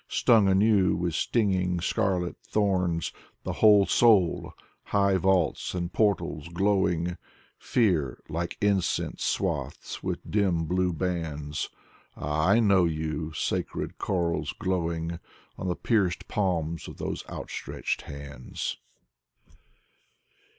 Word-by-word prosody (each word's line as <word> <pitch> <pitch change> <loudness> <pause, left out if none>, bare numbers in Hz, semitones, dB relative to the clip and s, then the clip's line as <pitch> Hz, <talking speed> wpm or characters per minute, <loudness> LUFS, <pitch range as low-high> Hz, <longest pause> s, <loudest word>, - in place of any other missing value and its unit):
Stung 110 -4 +4
anew 95 0 +4
with 85 -1 -1
stinging 95 -3 +1
scarlet 90 0 0
thorns! 90 -5 0 0.3
The - - -3
whole 105 -2 +7
soul, 105 -8 +3 0.3
high 100 -1 +2
vaults 95 -2 +1
and 85 0 -3
portals 100 -7 0
glowing, 90 -1 +1 0.4
Fear 85 - +1
like 85 +2 -3
incense 100 -3 0
swathes - - -2
with - - -2
dim 95 -6 +1
blue 90 +2 +1
bands: 80 -4 -3 0.5
Ah, 75 +3 0
I 100 +4 +5
know 100 -5 +4
you, 80 0 -2
sacred - - -3
corals, 85 -3 -1
growing 85 -2 -2 0.4
On 95 - -3
the 90 - 0
pierced 95 -6 0
palms 85 -5 -1
of - - -9
these - - -4
outstretched - - -4
hands. 70 -2 -6
90 Hz, 110 wpm, -27 LUFS, 85-100 Hz, 0.5 s, whole